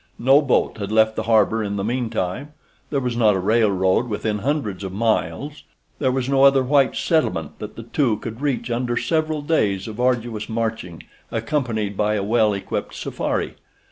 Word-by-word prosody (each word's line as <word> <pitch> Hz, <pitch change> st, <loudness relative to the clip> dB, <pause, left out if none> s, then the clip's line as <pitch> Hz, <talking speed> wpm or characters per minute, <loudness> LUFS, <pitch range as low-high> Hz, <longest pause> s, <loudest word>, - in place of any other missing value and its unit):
No 135 Hz, +4 st, +5 dB
boat 135 Hz, -5 st, +1 dB
had 100 Hz, 0 st, -4 dB
left 110 Hz, 0 st, +3 dB
the -, -, -1 dB
harbor 110 Hz, 0 st, +3 dB
in 100 Hz, -1 st, -3 dB
the 100 Hz, -, -2 dB
meantime—there 125 Hz, +5 st, -4 dB
was 125 Hz, -2 st, -2 dB
not 110 Hz, -4 st, +4 dB
a -, -, 0 dB
railroad 100 Hz, 0 st, +2 dB
within 105 Hz, -1 st, -2 dB
hundreds 110 Hz, -6 st, -2 dB
of 95 Hz, -, -4 dB
miles—there 130 Hz, +5 st, -2 dB
was 130 Hz, -1 st, -1 dB
no 135 Hz, 0 st, +3 dB
other 135 Hz, -1 st, +6 dB
white 135 Hz, 0 st, +3 dB
settlement 90 Hz, -, 0 dB
that 105 Hz, 0 st, -7 dB
the 115 Hz, -, -8 dB
two 120 Hz, -2 st, 0 dB
could 115 Hz, +3 st, -7 dB
reach 125 Hz, -5 st, -1 dB
under 120 Hz, 0 st, -1 dB
several 155 Hz, -2 st, 0 dB
days 105 Hz, -, 0 dB
of 110 Hz, +1 st, -8 dB
arduous 120 Hz, -3 st, 0 dB
marching 110 Hz, -7 st, -3 dB, 0.3 s
accompanied 115 Hz, -3 st, -2 dB
by 105 Hz, +1 st, +1 dB
a 100 Hz, -, -1 dB
well 110 Hz, +1 st, +3 dB
equipped 100 Hz, -1 st, -4 dB
safari. -, -, -3 dB
115 Hz, 170 wpm, -22 LUFS, 105-130 Hz, 0.3 s, other